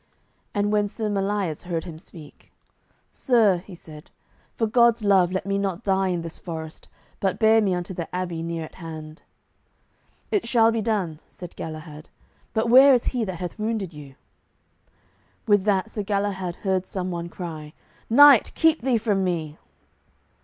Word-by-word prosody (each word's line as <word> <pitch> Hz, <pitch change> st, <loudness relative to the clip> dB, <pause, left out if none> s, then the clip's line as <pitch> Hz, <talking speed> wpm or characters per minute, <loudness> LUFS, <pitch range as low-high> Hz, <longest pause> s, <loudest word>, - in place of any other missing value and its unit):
And 205 Hz, 0 st, +1 dB
when 210 Hz, -1 st, +2 dB
Sir 215 Hz, +1 st, -4 dB
Melias 195 Hz, -5 st, -1 dB
heard 170 Hz, -2 st, -3 dB
him 160 Hz, -3 st, -9 dB
speak, 160 Hz, -4 st, -13 dB, 0.6 s
"Sir," 225 Hz, -8 st, +3 dB
he 180 Hz, +1 st, -12 dB
said, 155 Hz, -2 st, -13 dB, 0.5 s
"for 225 Hz, -, 0 dB
God's 235 Hz, 0 st, +3 dB
love 190 Hz, -3 st, +4 dB
let 185 Hz, -1 st, -3 dB
me 200 Hz, 0 st, -1 dB
not 195 Hz, -2 st, -3 dB
die 195 Hz, -1 st, +1 dB
in 175 Hz, -2 st, -2 dB
this 165 Hz, -1 st, -8 dB
forest, 160 Hz, -2 st, -8 dB, 0.3 s
but 190 Hz, -1 st, 0 dB
bear 220 Hz, 0 st, +4 dB
me 195 Hz, -3 st, +1 dB
unto 180 Hz, +1 st, -5 dB
the 170 Hz, -2 st, -5 dB
abbey 175 Hz, -3 st, -3 dB
near 165 Hz, -1 st, -4 dB
at -, -, -14 dB
hand." 155 Hz, -1 st, -9 dB, 1.1 s
"It 405 Hz, -, 0 dB
shall 230 Hz, -1 st, +4 dB
be 225 Hz, -1 st, -1 dB
done," 195 Hz, -8 st, -2 dB
said 180 Hz, -2 st, -11 dB
Galahad, 155 Hz, -1 st, -8 dB, 0.4 s
"but 225 Hz, 0 st, 0 dB
where 265 Hz, +3 st, +8 dB
is 240 Hz, -, -1 dB
he 245 Hz, -2 st, 0 dB
that 190 Hz, -2 st, -5 dB
hath 180 Hz, +4 st, -6 dB
wounded 215 Hz, -5 st, -2 dB
you?" 145 Hz, -3 st, -12 dB, 1.3 s
With 205 Hz, -3 st, +3 dB
that 205 Hz, +1 st, +1 dB
Sir 210 Hz, -, -3 dB
Galahad 200 Hz, -3 st, -2 dB
heard 190 Hz, -1 st, 0 dB
some 185 Hz, -1 st, -4 dB
one 170 Hz, 0 st, -5 dB
cry, 155 Hz, -4 st, -8 dB, 0.4 s
"Knight, 280 Hz, 0 st, +7 dB
keep 320 Hz, -3 st, +3 dB
thee 250 Hz, -1 st, +2 dB
from 210 Hz, -3 st, 0 dB
me!" 160 Hz, -4 st, -3 dB
190 Hz, 165 wpm, -24 LUFS, 170-220 Hz, 1.3 s, where